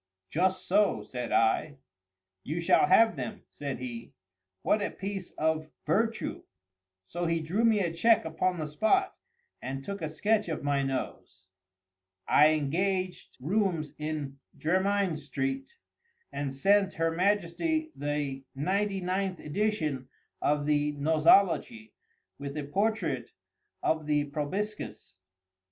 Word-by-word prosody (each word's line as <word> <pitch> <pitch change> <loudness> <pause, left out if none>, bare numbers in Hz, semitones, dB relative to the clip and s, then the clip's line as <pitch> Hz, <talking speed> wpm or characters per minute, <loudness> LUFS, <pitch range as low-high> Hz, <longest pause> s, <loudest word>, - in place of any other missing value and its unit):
"Just 185 +3 +1
so," 205 +1 +3
said 125 -2 -5
I. 140 +6 +2 0.7
"You 155 +4 -3
shall 170 - +4
have 225 -1 +5
them," 215 - -6
said 140 -2 -5
he. 120 -2 -7 0.5
"What 215 - +2
a 205 - 0
piece 195 -1 -5
of 155 0 0 0.2
virtu!" 225 +8 0 0.6
So 175 - -3
he 165 0 +1
drew 175 +8 -1
me 220 -3 +4
a 170 -3 -1
check 225 +6 +4
upon 175 +3 0
the 155 - -2
spot, 220 - +1 0.5
and 135 +1 -5
took 200 +6 -5
a 155 - -2
sketch 210 +5 +1
of 160 - -3
my 140 -1 +1
nose. 130 -8 -4 0.8
I 150 - +7
engaged 185 +5 -1
rooms 170 0 0
in 150 -3 -4 0.2
Jermyn 190 +1 +1
street, 265 - -3 0.6
and 140 -1 -3
sent 195 +8 +3
her 165 0 0
Majesty 205 - 0
the 145 -2 -2
ninety 195 +6 0
ninth 185 0 -1
edition 155 -7 -1 0.3
of 145 0 +1
the 150 0 +1
"Nosology," 155 - +3 0.5
with 140 +1 -5
a 150 - -2
portrait 165 - -1 0.5
of 155 -1 0
the 150 -1 +2
proboscis. 155 - -4
165 Hz, 125 wpm, -29 LUFS, 145-200 Hz, 0.8 s, I